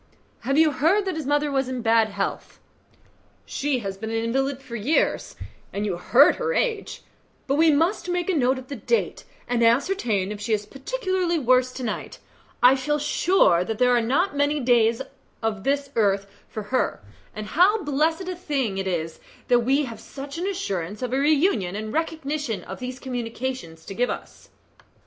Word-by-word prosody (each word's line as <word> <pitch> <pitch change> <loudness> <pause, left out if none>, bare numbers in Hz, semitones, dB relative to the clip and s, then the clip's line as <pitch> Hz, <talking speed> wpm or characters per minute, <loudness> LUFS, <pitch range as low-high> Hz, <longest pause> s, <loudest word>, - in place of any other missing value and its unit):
"Have 275 +4 -1
you 315 -1 +5
heard 330 +10 +2
that 375 -3 -2
his 310 -4 -4
mother 290 0 +1
is 265 -1 -2
in 255 -2 -4
bad 225 -1 +4
health?" 200 -1 -4 0.9
"She 270 -3 -1
has 195 -1 -4
been 220 - -4
an 225 - -2
invalid 265 +4 0
for 255 -3 -9
years, 240 +9 0 0.4
and 205 +1 -2
you 195 -4 -1
heard 250 +10 +5
her 475 0 -1
age; 455 -4 -1 0.4
but 275 - 0
we 320 +3 +5
must 335 +6 +1
make 355 -1 -1
a 380 - +1
note 260 -4 +2
of 260 0 -9
the 280 - -5
date, 465 - -1 0.2
and 245 -1 0
ascertain 230 - +2
if 210 -1 -6
she 220 +2 -1
is 210 -1 0
particularly 365 - -2
worse 255 -2 +3
to 255 - -6
night. 225 - -4 0.5
I 250 +2 +8
feel 295 +3 0
sure 295 - +3
that 220 +3 -4
there 250 +1 +4
are 240 - +3
not 290 +11 +1
many 285 +1 +1
days 235 -1 +3 0.4
of 210 -3 -1
this 280 +1 0
earth 200 -3 +2 0.2
for 215 - -5
her, 255 - 0 0.3
and 215 0 -5
how 375 - +3
blessed 315 +5 0
a 370 - -3
thing 275 - -2
it 190 - -2
is 165 -3 -3 0.3
that 245 -1 +5
we 270 +5 +2
have 230 -3 -8
such 280 +3 -8
an 365 - -2
assurance 205 - -3
of 250 0 -3
a 265 - +2
reunion 285 - +2
and 215 +1 -5
recognition 300 -7 -2
as 190 - -8
these 255 0 -5
communications 245 -9 -5
give 240 +6 -1
to - - +1
us." - - -16
260 Hz, 185 wpm, -24 LUFS, 225-305 Hz, 0.9 s, I